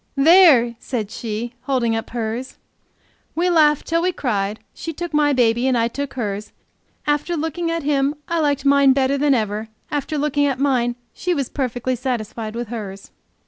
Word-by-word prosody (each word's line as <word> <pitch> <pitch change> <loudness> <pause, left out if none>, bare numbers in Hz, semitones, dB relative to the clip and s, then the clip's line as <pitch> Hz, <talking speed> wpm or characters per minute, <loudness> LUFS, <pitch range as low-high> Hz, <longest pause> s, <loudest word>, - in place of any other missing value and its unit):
"There!" 280 -6 +6
said 220 -5 -4
she, 230 +1 -4
holding 245 -5 +1
up 225 - -4
hers. 235 +2 -4 0.8
We 355 +2 +2
laughed 300 -3 +4
till 330 0 +1
we 365 +1 +1
cried; 210 - -2
she 330 - -6
took 345 +1 -6
my 295 -1 +3
baby 240 -1 +2
and 255 -2 +2
I 230 0 +2
took 280 +2 -5
hers; 210 -3 -4 0.5
after 295 +4 0
looking 325 +2 -2
at 330 -1 -2
him 280 0 +1
I 335 0 0
liked 285 -3 0
mine 280 -1 +5
better 270 0 +2
than 285 -1 +3
ever; 215 -1 -2 0.2
after 295 +1 -2
looking 290 0 +1
at 270 -2 -1
mine 250 -3 +1 0.2
she 360 -1 -1
was 275 -4 -2
perfectly 255 -1 -2
satisfied 230 -3 -4
with 240 -2 -4
hers. 200 -4 -7
265 Hz, 175 wpm, -21 LUFS, 230-295 Hz, 0.8 s, There